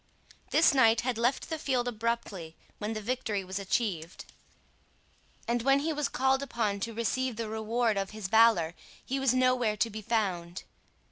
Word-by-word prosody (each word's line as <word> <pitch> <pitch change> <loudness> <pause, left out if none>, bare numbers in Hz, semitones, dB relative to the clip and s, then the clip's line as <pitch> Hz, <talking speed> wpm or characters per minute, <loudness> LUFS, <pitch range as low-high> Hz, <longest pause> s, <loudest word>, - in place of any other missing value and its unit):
This 320 -1 +5
knight 230 -4 +5
had 245 -2 -2
left 245 +7 0
the 320 - -2
field 255 -4 0
abruptly 220 -8 -3 0.2
when 215 +1 -3
the 215 -1 -5
victory 225 -4 -2
was 190 +2 -4
achieved; 190 -5 -2 1.2
and 240 0 0
when 275 +3 +3
he 320 +2 -1
was 295 -1 -1
called 265 +1 +1
upon 220 -7 -1
to 230 +3 -4
receive 240 +2 -1
the 225 0 -4
reward 220 0 0
of 195 -1 -1
his 215 -2 -6
valour, 220 -6 +4 0.3
he 270 +1 -2
was 265 -2 +2
nowhere 255 -4 +2
to 230 - +1
be 215 +1 -6
found. 185 -6 -2
230 Hz, 165 wpm, -29 LUFS, 205-255 Hz, 1.2 s, This